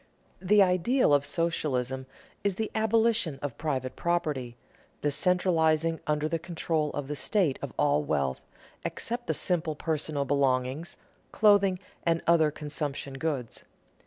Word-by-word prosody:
The 200 Hz, +2 st, +5 dB
ideal 185 Hz, -, +3 dB
of 140 Hz, -1 st, +3 dB
socialism 130 Hz, -6 st, -1 dB, 0.4 s
is 200 Hz, -2 st, +1 dB
the 220 Hz, +2 st, -3 dB
abolition 220 Hz, -7 st, +2 dB
of 145 Hz, -4 st, -4 dB
private 130 Hz, -5 st, -2 dB
property, 150 Hz, -9 st, -1 dB, 0.4 s
the 145 Hz, -, +1 dB
centralizing 165 Hz, -1 st, +2 dB
under 150 Hz, 0 st, +1 dB
the 165 Hz, +1 st, -1 dB
control 160 Hz, -2 st, -1 dB
of 145 Hz, -2 st, -4 dB
the 150 Hz, -, -3 dB
state 175 Hz, -3 st, +1 dB
of 140 Hz, -, -5 dB
all 145 Hz, 0 st, +2 dB
wealth, 70 Hz, -, -1 dB, 0.4 s
except 240 Hz, +1 st, -3 dB
the -, -, 0 dB
simple 165 Hz, -4 st, 0 dB
personal 150 Hz, -2 st, -1 dB
belongings, 135 Hz, +2 st, 0 dB, 0.3 s
clothing 200 Hz, -3 st, +4 dB, 0.3 s
and 165 Hz, -1 st, +1 dB
other 165 Hz, -2 st, +4 dB
consumption 145 Hz, -2 st, -5 dB
goods. 135 Hz, -7 st, -3 dB
155 Hz, 130 wpm, -28 LUFS, 140-180 Hz, 0.4 s, The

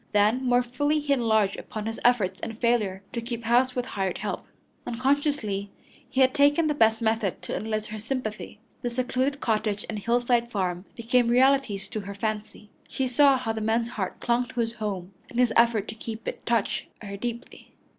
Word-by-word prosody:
Then 210 Hz, +5 st, +3 dB
more 245 Hz, -1 st, +3 dB
fully 290 Hz, +5 st, 0 dB
he 285 Hz, -1 st, +1 dB
enlarged 220 Hz, -6 st, +2 dB
upon 215 Hz, -1 st, -6 dB
his 225 Hz, 0 st, -4 dB
efforts 205 Hz, -7 st, +3 dB
and 225 Hz, -1 st, -5 dB
failure 215 Hz, -6 st, +1 dB
to 235 Hz, -, -2 dB
keep 235 Hz, 0 st, -5 dB
house 245 Hz, +3 st, +3 dB
with 250 Hz, -1 st, -1 dB
hired 190 Hz, -5 st, -2 dB
help. -, -, -4 dB, 0.4 s
Unconsciously, 250 Hz, -5 st, 0 dB, 0.4 s
he 265 Hz, -, +1 dB
had 260 Hz, 0 st, +5 dB
taken 290 Hz, +3 st, +4 dB
the 305 Hz, -, +2 dB
best 225 Hz, -4 st, +3 dB
method 220 Hz, -4 st, 0 dB
to -, -, -3 dB
enlist 215 Hz, +1 st, -3 dB
her 215 Hz, -, -5 dB
sympathy. 220 Hz, -3 st, -4 dB, 0.2 s
The 240 Hz, -, -1 dB
secluded 255 Hz, +3 st, -1 dB
cottage 215 Hz, -2 st, 0 dB
and 215 Hz, -1 st, -4 dB
hillside 235 Hz, +2 st, +1 dB
farm 185 Hz, -4 st, -2 dB
became 240 Hz, 0 st, +2 dB
realities 250 Hz, -4 st, +3 dB
to 215 Hz, -, -3 dB
her 200 Hz, 0 st, -7 dB
fancy. 210 Hz, 0 st, -4 dB, 0.2 s
She 265 Hz, -, -1 dB
saw 275 Hz, +2 st, +5 dB
how 235 Hz, -3 st, -2 dB
the 220 Hz, -, -4 dB
man's 225 Hz, +2 st, +1 dB
heart 205 Hz, -6 st, -4 dB
clung 245 Hz, 0 st, +1 dB
to 245 Hz, -1 st, -2 dB
his 225 Hz, 0 st, -1 dB
home, 200 Hz, -4 st, -4 dB, 0.2 s
and 240 Hz, -, -8 dB
his 250 Hz, -2 st, +3 dB
effort 230 Hz, -3 st, +4 dB
to -, -, -4 dB
keep 225 Hz, 0 st, -7 dB
it -, -, -5 dB
touched 235 Hz, -3 st, +1 dB, 0.2 s
her 200 Hz, -1 st, -6 dB
deeply. 235 Hz, +3 st, -7 dB
230 Hz, 190 wpm, -26 LUFS, 215-250 Hz, 0.4 s, had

